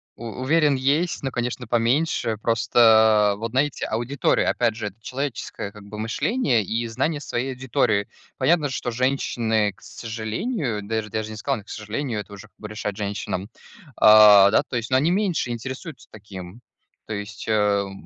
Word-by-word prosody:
У 120 Hz, -, -10 dB, 0.2 s
уверен, 150 Hz, +1 st, +3 dB
есть, 145 Hz, +7 st, 0 dB
но, 135 Hz, -, -2 dB
конечно, 125 Hz, 0 st, -3 dB
поменьше. 120 Hz, 0 st, +1 dB
Просто, 110 Hz, -3 st, +4 dB
вот 115 Hz, +2 st, -5 dB
знаете, 135 Hz, +3 st, 0 dB
аудитория, 120 Hz, +5 st, 0 dB
опять 120 Hz, -3 st, +1 dB
же, 110 Hz, -, -4 dB
это 100 Hz, +1 st, -10 dB
человеческое, 130 Hz, -5 st, -5 dB
как 105 Hz, -1 st, -13 dB
бы, 100 Hz, +1 st, -10 dB
мышление 120 Hz, -, 0 dB
и 115 Hz, +4 st, -2 dB
знание 145 Hz, +6 st, -2 dB
своей 130 Hz, -1 st, -3 dB
аудитории. 115 Hz, -5 st, 0 dB, 0.3 s
Понятно, 160 Hz, -3 st, +2 dB
что 125 Hz, -1 st, -3 dB
женщины, 115 Hz, -4 st, 0 dB
к -, -, -27 dB
сожалению, 115 Hz, -, -4 dB
даже 110 Hz, +1 st, -3 dB
даже 110 Hz, +1 st, -3 dB
не 110 Hz, -, -7 dB
сказал: 105 Hz, 0 st, -2 dB
"К -, -, -20 dB
сожалению", 110 Hz, +2 st, -4 dB
это 100 Hz, 0 st, -9 dB
уже, 100 Hz, +1 st, -11 dB
как -, -, -40 dB
бы, 105 Hz, -, -8 dB
решать 105 Hz, -1 st, -5 dB
женщинам, 100 Hz, -1 st, -4 dB, 0.5 s
а, 105 Hz, -2 st, +8 dB
да, -, -, +3 dB
то -, -, -7 dB
есть, 115 Hz, -1 st, -2 dB
но 130 Hz, -, +5 dB
они 150 Hz, +6 st, +2 dB
меньше 185 Hz, -9 st, 0 dB
интересуются 130 Hz, +7 st, -7 dB
таким. 100 Hz, -1 st, -10 dB, 0.5 s
То 110 Hz, -, -4 dB
есть, 105 Hz, 0 st, -7 dB
э, -, -, 0 dB
м, 100 Hz, -2 st, +1 dB
115 Hz, 170 wpm, -23 LUFS, 105-130 Hz, 0.5 s, а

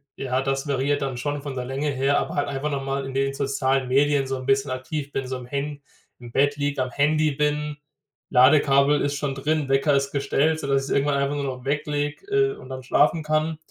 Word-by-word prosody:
ja, 130 Hz, -1 st, -1 dB
das 135 Hz, +1 st, -1 dB
variiert 140 Hz, +1 st, 0 dB
dann 135 Hz, -2 st, -2 dB
schon 145 Hz, +3 st, -3 dB
von 140 Hz, -1 st, -6 dB
der 125 Hz, -1 st, -3 dB
Länge 135 Hz, +3 st, -2 dB
her, 135 Hz, +1 st, +1 dB
aber -, -, -4 dB
halt 145 Hz, -, 0 dB
einfach 140 Hz, +1 st, -2 dB
noch 140 Hz, -2 st, -2 dB
mal 135 Hz, 0 st, -2 dB
in 135 Hz, -, -7 dB
den 135 Hz, 0 st, +1 dB
sozialen 135 Hz, -1 st, 0 dB
Medien 140 Hz, +1 st, +2 dB
so 135 Hz, -, -2 dB
'n 130 Hz, -, -7 dB
bisschen 135 Hz, +1 st, +2 dB
aktiv 140 Hz, +3 st, -4 dB
bin, 135 Hz, -, -3 dB
so 130 Hz, 0 st, -4 dB
im 125 Hz, -, -10 dB
Han 140 Hz, +1 st, -3 dB, 0.4 s
im 120 Hz, -1 st, -11 dB
Bett 145 Hz, +3 st, +2 dB
liege, 145 Hz, -1 st, -1 dB
am 130 Hz, -, -6 dB
Handy 155 Hz, +2 st, +2 dB
bin. 150 Hz, +1 st, -1 dB, 0.5 s
Ladekabel 140 Hz, +2 st, +5 dB
ist 145 Hz, 0 st, 0 dB
schon 145 Hz, -1 st, -2 dB
drin, 150 Hz, +1 st, -1 dB
Wecker 135 Hz, +2 st, +3 dB
ist 140 Hz, 0 st, 0 dB
gestellt, 145 Hz, +3 st, +1 dB
sodass 140 Hz, -2 st, 0 dB
ich 135 Hz, -, -6 dB
es -, -, +1 dB
irgendwann 140 Hz, +1 st, +2 dB
einfach 140 Hz, +1 st, 0 dB
nur 145 Hz, -, -2 dB
noch 130 Hz, -1 st, -5 dB
weglege, 145 Hz, -, -2 dB
äh, 410 Hz, 0 st, +2 dB
und -, -, -12 dB
dann 130 Hz, 0 st, -6 dB
schlafen 150 Hz, +5 st, +2 dB
kann. 155 Hz, +1 st, 0 dB
140 Hz, 230 wpm, -24 LUFS, 135-145 Hz, 0.5 s, Ladekabel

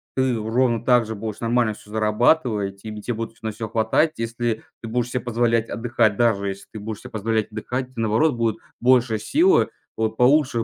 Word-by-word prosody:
ты 130 Hz, -2 st, +1 dB
ровно 115 Hz, +1 st, +1 dB
так 125 Hz, -2 st, +4 dB
же 110 Hz, -, -5 dB
будешь 110 Hz, 0 st, -5 dB
нормально 115 Hz, -1 st, +1 dB
всё 105 Hz, 0 st, -15 dB
зарабатывать, 110 Hz, -1 st, +2 dB
и -, -, -26 dB
тебе 105 Hz, 0 st, -7 dB
те 120 Hz, -, -3 dB
будет 115 Hz, 0 st, -6 dB
на 110 Hz, -, -3 dB
всё 110 Hz, +1 st, -5 dB
хватать. 115 Hz, +9 st, +2 dB
Если 115 Hz, 0 st, -4 dB, 0.2 s
ты -, -, -19 dB, 0.2 s
ты 115 Hz, -, -5 dB
будешь 120 Hz, +1 st, -1 dB
се 125 Hz, -, -1 dB
позволять 115 Hz, -1 st, 0 dB
отдыхать- 115 Hz, -2 st, +1 dB
даже 110 Hz, -4 st, +2 dB
если 100 Hz, 0 st, -7 dB
ты 110 Hz, -, -6 dB
будешь 105 Hz, 0 st, -6 dB
себе 125 Hz, -, -10 dB
позволять 110 Hz, 0 st, -1 dB
отдыхать- 125 Hz, +4 st, -4 dB
наоборот, 115 Hz, +6 st, +2 dB
будет 115 Hz, -2 st, 0 dB, 0.2 s
больше 125 Hz, -2 st, +4 dB
силы 340 Hz, -, +3 dB, 0.3 s
вот 110 Hz, 0 st, -1 dB
получше 125 Hz, -2 st, +3 dB
115 Hz, 200 wpm, -23 LUFS, 110-125 Hz, 0.3 s, так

